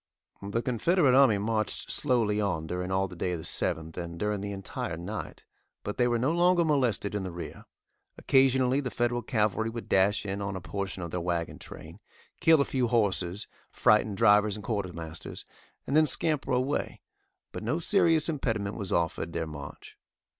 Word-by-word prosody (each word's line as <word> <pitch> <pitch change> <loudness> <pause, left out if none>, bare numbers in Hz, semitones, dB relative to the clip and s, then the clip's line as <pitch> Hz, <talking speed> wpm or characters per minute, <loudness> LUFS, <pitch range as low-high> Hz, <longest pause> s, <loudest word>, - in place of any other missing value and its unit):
The 100 +4 -2
Confederate 135 - +2
army 130 -6 +6
marched 110 +1 -2
slowly 115 -7 +1
on 90 -6 -1
during 90 +2 -3
all 95 +1 +1
day 90 0 -3
of - - -2
the 80 - -8
7th, 80 0 -2
and 85 -1 -5
during 105 +1 -1
the 100 0 -4
entire 95 -4 -4
night, 100 +6 -6 0.4
but 105 - -4
they 120 - +4
were 120 -1 +1
no 130 +6 +1
longer 175 0 +3
molested 125 - +1
in 105 - -1
the 95 - -4
rear. 85 0 -8 0.5
Occasionally 130 0 +3
the 135 -3 -3
Federal 120 0 0
cavalry 110 0 0
would 115 0 -7
dash 100 +2 +2
in 100 0 -3
on 100 -1 -3
a - - -3
portion 95 0 -4
of 85 - -6
their 90 - -2
wagon 85 -1 -2
train, - - -11 0.4
kill 160 -3 +5
a - - +2
few 130 -2 0
horses, 100 -4 0 0.2
frighten 105 -1 +3
drivers 105 -1 +4
and 105 - -8
Quartermasters, 90 -7 -5 0.4
and 140 - -2
then 155 0 +5
scamper 150 +1 +1
away, 130 +3 -1 0.5
but - - -6
no 120 +9 -1
serious 165 -3 +3
impediment 115 -10 -2
was 100 -3 -4
offered 85 0 -1
their 85 -1 -2
march. 75 -3 -10
105 Hz, 175 wpm, -28 LUFS, 95-125 Hz, 0.5 s, army